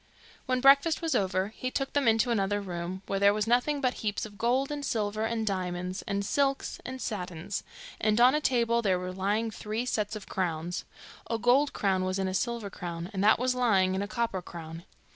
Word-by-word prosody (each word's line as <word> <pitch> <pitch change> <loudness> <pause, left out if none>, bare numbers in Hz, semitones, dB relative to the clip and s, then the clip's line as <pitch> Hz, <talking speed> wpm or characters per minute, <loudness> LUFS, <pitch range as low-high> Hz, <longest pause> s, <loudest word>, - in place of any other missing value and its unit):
When 255 -1 +1
breakfast 280 +5 +5
was 325 - +1
over, 190 0 +1
he 255 +3 -4
took 270 +1 -3
them 285 -3 +2
into 225 +2 +3
another 205 -2 +1
room, 185 0 -5
where 195 - -1
there 200 +1 +5
was 210 -1 0
nothing 250 +5 +2
but 255 -2 +2
heaps 210 -1 -1
of 210 -1 -11
gold, 250 +6 +1
and 290 -1 -4
silver, 215 -3 -1
and 225 -1 -1
diamonds, 185 -1 -2
and 200 -1 -1
silks, 275 +5 0
and 260 +1 -6
satins; 180 -5 -4 0.4
and 215 +1 +2
on 250 +2 +7
a 300 - +1
table 235 -3 +2
there 190 -5 +2
was 180 0 -5
lying 210 +4 0
three 215 +3 -3
sets 215 -3 -1
of 210 - -8
crowns: 175 -2 -2 0.4
a 230 - 0
gold 250 +5 +3
crown 190 -2 +1
was 185 +1 -1
in 190 -1 0
a 185 - -2
silver 230 0 -2
crown, 175 +1 -6
and 190 0 -1
that 215 +1 +6
was 250 +1 +1
lying 200 -7 +3
in 190 - -1
a 205 - -2
copper 225 -3 -2
crown. 165 -1 -9
210 Hz, 210 wpm, -29 LUFS, 190-245 Hz, 0.4 s, on